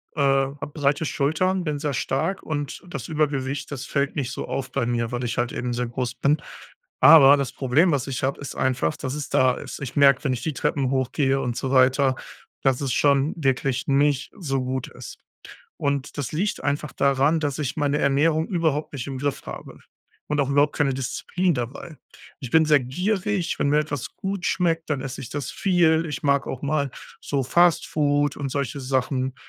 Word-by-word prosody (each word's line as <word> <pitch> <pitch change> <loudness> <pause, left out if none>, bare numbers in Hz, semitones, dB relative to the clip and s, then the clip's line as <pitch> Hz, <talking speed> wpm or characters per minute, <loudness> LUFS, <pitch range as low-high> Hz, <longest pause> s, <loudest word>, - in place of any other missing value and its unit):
äh, - - -6
hab 135 +1 0
breite 145 +1 +1
Schultern, 180 +7 0
bin 150 -3 -2
sehr 145 0 -2
stark 160 +9 -1
und 145 -3 -4
das 135 -8 -6
Übergewicht, 145 -3 -1
das 135 -1 -5
fällt 140 0 -1
nicht 130 -4 -2
so - - -5
auf 135 0 -4
bei 120 - -1
mir, 115 -1 -1
weil 125 0 -3
ich 120 - -3
halt 120 0 0
eben 125 0 -3
sehr 125 +1 -1
groß 120 0 -3
bin. 145 +4 +1 0.6
Aber 145 0 +9
das 135 -2 -2
Problem, 145 +8 +2
was 140 -3 0
ich 130 -2 -4
hab, 135 +1 -1
ist 140 - -7
einfach, 125 -12 0
dass 130 -1 -4
es 145 -1 -5
da 130 -1 +3
ist. - - -7
Ich 135 -3 -6
merk, 140 -1 +5
wenn 135 -3 +1
ich 125 - -4
die 155 +2 -2
Treppen 135 0 0
hochgehe 135 +1 +1
und 125 -3 -2
so 130 - -3
weiter, 130 0 +4 0.5
dass 135 -1 +2
es 135 -2 -1
schon 140 +1 +2
wirklich 135 -3 0
nicht 140 0 +2
so 135 -7 -1
gut 130 0 -3
ist - - -10 0.6
und 140 0 -2
das 140 -5 -3
liegt 185 0 -2
einfach 145 +1 -1
daran, 140 +3 +2
dass 145 -2 -2
ich 145 0 -3
meine 145 0 +1
Ernährung 155 +4 +2
überhaupt 160 -5 -1
nicht 130 -4 -4
im 135 -2 -5
Griff 145 +1 -2
habe - - -8 0.5
und 150 0 -1
auch 140 -1 +1
überhaupt 145 +1 +3
keine 140 -3 +1
Disziplin 165 +7 -1
dabei. 140 +5 -6 0.4
Ich 130 - -7
bin 160 0 +5
sehr 150 -1 +5
gierig, 185 - -1
wenn 145 - +2
mir 150 +1 +4
etwas 145 -4 -4
gut 195 -2 -4
schmeckt, 165 -3 0
dann 145 -3 -1
esse 135 +1 -6
ich 130 - -8
das 145 -1 -4
viel. 170 -4 +2
Ich 150 - -5
mag 140 -1 +2
auch 130 - -5
mal 140 -1 0 0.3
so 140 -2 -1
Fast 175 +6 +3
Food 145 -1 +1
und 140 -1 -3
solche 140 0 -3
Sachen 130 0 -1
140 Hz, 200 wpm, -24 LUFS, 130-150 Hz, 0.6 s, Aber